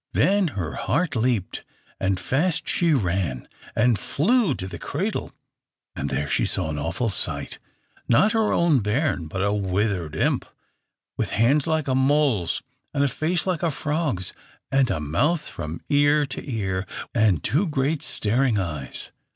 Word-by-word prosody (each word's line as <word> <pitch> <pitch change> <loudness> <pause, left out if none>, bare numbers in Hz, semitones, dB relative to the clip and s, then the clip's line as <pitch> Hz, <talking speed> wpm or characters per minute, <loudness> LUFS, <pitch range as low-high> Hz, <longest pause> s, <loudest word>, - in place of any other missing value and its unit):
Then 200 -1 +3
her 80 -4 -2
heart 145 +7 0
leaped, 115 -4 0 0.4
and 95 -1 0
fast 150 - 0
she 170 -2 +2
ran 90 - 0 0.3
and 115 -2 +3
flew 190 - +2
to 95 - -4
the - - -7
cradle; - - -3 0.6
and - - -3
there 75 - -1
she - - +1
saw 80 - -1
an 75 - -3
awful 95 - -1
sight - - -1 0.5
not 195 - +4
her 225 -2 +2
own 170 -5 +3
bairn, 105 - 0
but 95 +4 -2
a 100 0 +2
withered 95 -4 -1
imp, - - +1 0.7
with - - -1
hands 135 +7 +3
like 160 -2 0
a 130 - +1
mole's, 130 - +2 0.3
and 140 - +3
a - - +4
face 160 +5 0
like 185 -4 -1
a 170 - +2
frog's, 150 - -2 0.4
and 135 -2 +3
a 80 - 0
mouth 145 - 0
from 80 +2 -6
ear 145 +1 +4
to 135 +1 -6
ear, 95 -4 -2 0.3
and 105 -9 +3
two 175 +9 +1
great 145 0 0
staring 115 +2 +1
eyes." 75 -9 -4
125 Hz, 160 wpm, -24 LUFS, 95-150 Hz, 0.7 s, not